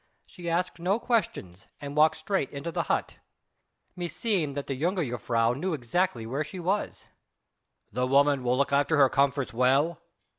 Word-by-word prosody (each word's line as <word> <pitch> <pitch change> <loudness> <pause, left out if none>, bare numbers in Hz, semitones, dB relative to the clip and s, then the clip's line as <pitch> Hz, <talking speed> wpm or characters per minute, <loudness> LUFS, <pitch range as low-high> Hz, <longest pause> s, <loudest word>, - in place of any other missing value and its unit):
She 175 -1 -7
asked 175 +1 -1
no 185 +5 +1
questions, 170 - -2
and 145 0 -7
walked 155 +1 +4
straight 160 -2 -1
into 145 +4 -5
the - - -1
hut. - - -1 0.8
Meseemed 175 -4 -2
that 140 - -3
the 140 - -3
jongejuffrouw 125 - 0
knew 180 +6 -2
exactly 130 -1 -1
where 135 +6 -2
she 180 +5 -8
was." 190 +4 -2 0.9
"The 125 +3 0
woman 140 0 +3
will 125 +1 +1
look 140 0 +1
after 145 +3 +3
her 135 -2 +6
comforts 140 -1 +1
well?" 140 +8 +2
145 Hz, 155 wpm, -27 LUFS, 130-175 Hz, 0.9 s, her